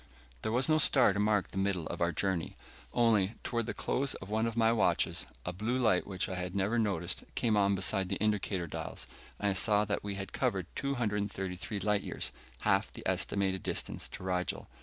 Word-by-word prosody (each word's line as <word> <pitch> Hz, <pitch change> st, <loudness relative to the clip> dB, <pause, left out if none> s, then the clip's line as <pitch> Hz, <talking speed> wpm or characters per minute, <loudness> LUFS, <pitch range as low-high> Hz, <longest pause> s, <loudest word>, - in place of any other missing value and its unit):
There -, -, -2 dB
was 125 Hz, +3 st, +3 dB
no 155 Hz, 0 st, +4 dB
star 130 Hz, -8 st, +6 dB
to 100 Hz, -, -2 dB
mark 105 Hz, -1 st, +2 dB
the 95 Hz, -, -3 dB
middle 95 Hz, -4 st, 0 dB
of -, -, -5 dB
our 85 Hz, 0 st, +3 dB
journey. 95 Hz, -2 st, -1 dB, 0.3 s
Only, 115 Hz, -3 st, +3 dB
toward 115 Hz, -2 st, -1 dB
the -, -, -3 dB
close 135 Hz, +1 st, 0 dB
of 95 Hz, +2 st, -9 dB
one 110 Hz, +1 st, +1 dB
of 115 Hz, 0 st, -4 dB
my 115 Hz, 0 st, +4 dB
watches, 115 Hz, -2 st, +1 dB, 0.2 s
a 90 Hz, -, -2 dB
blue 110 Hz, +7 st, -1 dB
light 110 Hz, -8 st, +2 dB
which 95 Hz, -2 st, -2 dB
I 95 Hz, -, -4 dB
had 90 Hz, +1 st, -4 dB
never 100 Hz, +5 st, +1 dB
noticed 95 Hz, -6 st, 0 dB
came 115 Hz, -3 st, +2 dB
on 100 Hz, -1 st, +3 dB
beside 95 Hz, 0 st, +1 dB
the -, -, 0 dB
indicator 105 Hz, -4 st, 0 dB
dials, 80 Hz, -, -5 dB, 0.3 s
and 105 Hz, -, +1 dB
I -, -, +1 dB
saw 105 Hz, +2 st, +3 dB
that 100 Hz, 0 st, -1 dB
we 100 Hz, -1 st, -3 dB
had 95 Hz, 0 st, -6 dB
covered 95 Hz, -3 st, 0 dB
233 105 Hz, -6 st, -2 dB
light 105 Hz, +1 st, +2 dB
years, -, -, -3 dB, 0.3 s
half -, -, +2 dB
the -, -, -10 dB
estimated 95 Hz, -2 st, +1 dB
distance -, -, -2 dB
to -, -, -8 dB
Rigel. 90 Hz, -1 st, -2 dB
100 Hz, 200 wpm, -32 LUFS, 95-110 Hz, 0.3 s, star